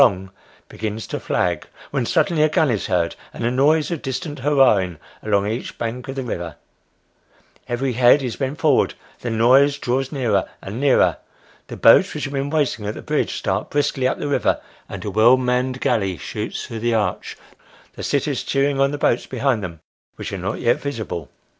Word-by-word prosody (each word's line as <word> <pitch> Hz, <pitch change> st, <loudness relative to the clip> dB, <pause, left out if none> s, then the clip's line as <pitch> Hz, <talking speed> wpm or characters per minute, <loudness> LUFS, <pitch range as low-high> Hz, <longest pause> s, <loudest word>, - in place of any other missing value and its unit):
long 95 Hz, -7 st, +3 dB, 0.4 s
begins 110 Hz, 0 st, -5 dB
to -, -, -4 dB
flag, 85 Hz, -3 st, -1 dB, 0.2 s
when 135 Hz, -4 st, -1 dB
suddenly 170 Hz, -5 st, +2 dB
a 155 Hz, -, +4 dB
gun 150 Hz, -2 st, +2 dB
is 105 Hz, -, -1 dB
heard, 85 Hz, -3 st, 0 dB, 0.2 s
and -, -, -7 dB
a 120 Hz, -, +1 dB
noise 150 Hz, +5 st, +3 dB
of 170 Hz, -, -3 dB
distant 145 Hz, +2 st, -4 dB
hurra'ing 125 Hz, -, +3 dB, 0.2 s
along 100 Hz, -2 st, +1 dB
each 110 Hz, +3 st, -4 dB
bank 120 Hz, +2 st, -4 dB
of 135 Hz, -, -5 dB
the 135 Hz, -, -3 dB
river 85 Hz, -9 st, -5 dB, 1.1 s
every 125 Hz, +2 st, -1 dB
head 125 Hz, +4 st, +5 dB
is 125 Hz, -4 st, -3 dB
bent 135 Hz, +2 st, -2 dB
forward 155 Hz, -5 st, +2 dB, 0.2 s
the 120 Hz, -, -4 dB
noise 130 Hz, +6 st, +4 dB
draws 130 Hz, 0 st, -1 dB
nearer 115 Hz, -9 st, 0 dB
and 100 Hz, +5 st, -7 dB
nearer 140 Hz, -2 st, +4 dB, 0.5 s
the -, -, -8 dB
boats -, -, +6 dB
which -, -, -4 dB
have 135 Hz, -, -4 dB
been 140 Hz, 0 st, -1 dB
waiting 145 Hz, -8 st, 0 dB
at 105 Hz, -, -3 dB
the -, -, -7 dB
bridge -, -, -1 dB
start -, -, -2 dB
briskly 140 Hz, -3 st, +1 dB
up -, -, -1 dB
the -, -, -3 dB
river, 145 Hz, -, +1 dB, 0.3 s
and -, -, -7 dB
a 105 Hz, -, -2 dB
well 115 Hz, +5 st, +6 dB
manned 125 Hz, 0 st, 0 dB
galley 100 Hz, -9 st, 0 dB
shoots -, -, -5 dB
through 115 Hz, -, -6 dB
the 120 Hz, +1 st, +1 dB
arch, 105 Hz, -5 st, -2 dB, 0.6 s
the -, -, -9 dB
sitters -, -, 0 dB
cheering 140 Hz, 0 st, 0 dB
on 135 Hz, 0 st, +4 dB
the 145 Hz, -, -3 dB
boats 125 Hz, -4 st, +1 dB
behind 130 Hz, -4 st, 0 dB
them, 85 Hz, -3 st, -6 dB, 0.4 s
which -, -, -6 dB
are 95 Hz, -, -3 dB
not 95 Hz, +3 st, -3 dB
yet 120 Hz, -, +2 dB
visible. 110 Hz, -, -4 dB
125 Hz, 190 wpm, -21 LUFS, 105-140 Hz, 1.1 s, boats